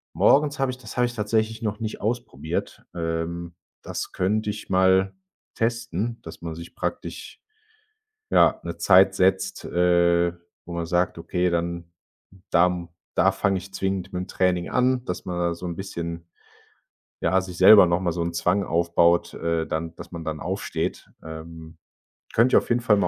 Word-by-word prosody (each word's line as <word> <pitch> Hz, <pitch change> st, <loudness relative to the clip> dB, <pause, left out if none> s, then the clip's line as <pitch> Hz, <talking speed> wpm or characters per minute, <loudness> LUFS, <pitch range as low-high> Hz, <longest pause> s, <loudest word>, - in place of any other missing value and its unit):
Morgens 145 Hz, 0 st, +4 dB
habe 135 Hz, -1 st, +1 dB
ich 125 Hz, -, -8 dB
das 125 Hz, -, -11 dB
habe 125 Hz, -, +4 dB
ich 120 Hz, 0 st, -4 dB
tatsächlich 110 Hz, +1 st, 0 dB
noch 105 Hz, -2 st, -2 dB
nicht 110 Hz, -1 st, -5 dB
ausprobiert. 90 Hz, -, -3 dB
Ähm, 85 Hz, +1 st, -3 dB, 0.3 s
das -, -, -5 dB
könnte 105 Hz, +3 st, 0 dB
ich 105 Hz, 0 st, -6 dB
mal 95 Hz, +1 st, +3 dB, 0.4 s
testen, 115 Hz, -1 st, -2 dB
dass 80 Hz, -, -10 dB
man 85 Hz, -1 st, -5 dB
sich 85 Hz, +1 st, -10 dB
praktisch, -, -, -5 dB, 0.9 s
ja, -, -, +4 dB
'ne -, -, -5 dB
Zeit 95 Hz, +1 st, +6 dB
setzt, 95 Hz, 0 st, +1 dB
äh, 85 Hz, -1 st, +3 dB, 0.3 s
wo 85 Hz, -, -8 dB
man 85 Hz, -1 st, -2 dB
sagt: 90 Hz, +1 st, 0 dB
„Okay, 90 Hz, +2 st, 0 dB
dann 85 Hz, 0 st, -3 dB, 0.6 s
da 85 Hz, +1 st, +5 dB
m 90 Hz, -1 st, -4 dB, 0.3 s
da -, -, +4 dB
fange 100 Hz, -1 st, 0 dB
ich 95 Hz, +1 st, -9 dB
zwingend 95 Hz, -1 st, -2 dB
mit'm 90 Hz, 0 st, -3 dB
Training 90 Hz, -2 st, 0 dB
an,“ 125 Hz, 0 st, +1 dB
dass 90 Hz, -, -5 dB
man 90 Hz, -1 st, -3 dB
da 85 Hz, -1 st, +1 dB
so 90 Hz, -, -8 dB
'n 85 Hz, -, -4 dB
bisschen, 85 Hz, -2 st, -6 dB, 0.9 s
ja, 95 Hz, -, +2 dB
sich 95 Hz, -1 st, -8 dB
selber 100 Hz, +1 st, +9 dB
noch 85 Hz, +1 st, +1 dB
mal 90 Hz, -2 st, 0 dB
so 85 Hz, +1 st, -2 dB
'n 85 Hz, 0 st, -2 dB
Zwang 90 Hz, +4 st, +1 dB
aufbaut 85 Hz, 0 st, +2 dB
äh, 85 Hz, -1 st, -1 dB
dann 80 Hz, +1 st, -3 dB
dass -, -, -11 dB
man 85 Hz, -1 st, -6 dB
dann 80 Hz, -1 st, -4 dB
aufsteht. 95 Hz, +3 st, -3 dB
Ähm, 80 Hz, 0 st, -10 dB, 0.6 s
könnte 120 Hz, +3 st, +4 dB
ich -, -, +9 dB
auf -, -, -13 dB
jeden 120 Hz, 0 st, +2 dB
Fall 110 Hz, -3 st, +4 dB
mal -, -, +2 dB
90 Hz, 175 wpm, -24 LUFS, 85-100 Hz, 0.9 s, selber